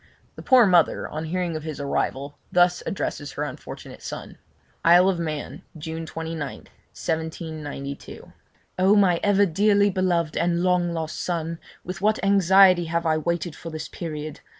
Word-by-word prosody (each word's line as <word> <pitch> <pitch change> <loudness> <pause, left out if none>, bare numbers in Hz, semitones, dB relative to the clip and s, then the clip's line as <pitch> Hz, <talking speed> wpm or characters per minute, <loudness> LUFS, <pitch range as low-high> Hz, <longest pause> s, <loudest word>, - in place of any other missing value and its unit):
The - - -9
poor 255 -3 +6
mother, 175 -4 +3
on 155 +1 -5
hearing 175 0 -2
of 155 - -4
his 155 -1 -6
arrival, 140 0 -2
thus 175 0 +3
addresses 145 -6 -3
her 145 - -3
unfortunate 145 -3 -8
son: - - -8 0.4
'Isle 175 +2 +6
of 180 -3 -1
Man, 155 -3 -4 0.2
June 160 +1 -6
29th, 160 -3 -6 0.3
1792. 155 -3 -5 0.5
'Oh! 190 +3 +5
my 185 -5 +4
ever 205 0 +4
dearly 200 +3 +3
beloved 175 -4 0
and 170 +1 +1
long 180 -1 +2
lost 160 -1 -4
son, 165 -1 -3 0.2
with 180 0 -6
what 215 +1 +3
anxiety 190 -2 +5
have 170 +1 -2
I 160 -1 +2
waited 170 0 -2
for 165 - -8
this 155 -1 -6
period! 155 -3 -6
170 Hz, 150 wpm, -24 LUFS, 155-185 Hz, 0.5 s, poor